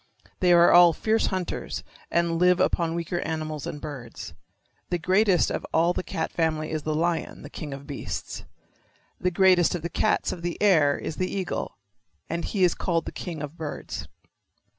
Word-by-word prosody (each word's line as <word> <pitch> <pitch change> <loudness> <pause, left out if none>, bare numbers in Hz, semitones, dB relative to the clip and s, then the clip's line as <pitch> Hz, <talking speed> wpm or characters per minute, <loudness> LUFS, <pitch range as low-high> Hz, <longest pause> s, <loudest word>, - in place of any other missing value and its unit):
They 180 -1 +4
are 170 0 +7
all 175 -1 +8
fierce 220 +6 +1
hunters 185 -2 -3 0.3
and 170 -1 +1
live 180 0 +4
upon 170 -3 +1
weaker 170 +1 -2
animals 155 -3 -4
and 150 - -5
birds. 130 - -8 0.6
The 175 - 0
greatest 185 +2 +3
of - - -3
all 170 +2 +3
the - - -2
cat 160 -3 -3
family 155 -2 -1
is 155 -1 -2
the 155 +1 -2
lion, 170 +1 -1
the - - -10
king 150 -3 -6
of 135 0 -7
beasts. 140 -2 -5 0.8
The 180 - +1
greatest 180 -1 +4
of 170 - -5
the 170 - -2
cats - - +1
of 180 - -6
the 175 0 -3
air 155 -9 +4
is 155 - -5
the 185 - -1
eagle, 190 - -3 0.5
and 170 0 -2
he 195 -3 0
is 175 - +4
called 165 -2 -1
the - - -5
king 165 -5 -6
of 150 +3 -7
birds. 155 -2 -6
170 Hz, 185 wpm, -26 LUFS, 155-180 Hz, 0.8 s, all